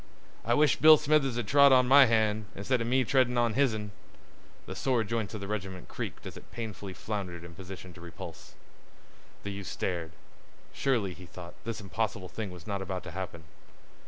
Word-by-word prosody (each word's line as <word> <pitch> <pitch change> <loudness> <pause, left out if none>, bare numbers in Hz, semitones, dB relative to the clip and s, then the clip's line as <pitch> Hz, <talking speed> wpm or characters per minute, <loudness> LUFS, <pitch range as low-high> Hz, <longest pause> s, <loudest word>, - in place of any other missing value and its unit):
"I 120 - +2
wish 150 0 +4
Bill 155 0 +9
Smithers 145 -4 +2
had 120 -4 -2
trod 140 +2 +7
on 130 -1 +6
my 135 +1 +8
hand, 110 -2 +2
insteader 115 +4 0
me 130 +3 +2
treddin' 130 -3 +2
on 120 -2 +2
his'n." 110 -6 +1 0.7
The - - -7
sore 125 -4 +1
joints 110 -2 -3
of 105 - -6
the 100 - -5
regiment 95 -3 -5
creaked - - -6
as - - -7
it - - -13
painfully 105 -4 -6
floundered 90 -5 -5
into 85 -1 -11
position 95 0 -9
to 85 - -13
repulse. 85 -1 -10 0.9
The 100 - -4
youth 100 -1 -7
stared. 85 -3 -3 0.6
Surely, 115 -9 0
he 90 0 -12
thought, 85 0 -10
this 115 -1 -4
impossible 100 -2 -3
thing 110 -3 -5
was 90 -2 -11
not 100 -2 -3
about 95 -1 -4
to 90 - -8
happen. 85 -2 -6
105 Hz, 185 wpm, -29 LUFS, 95-120 Hz, 0.9 s, Bill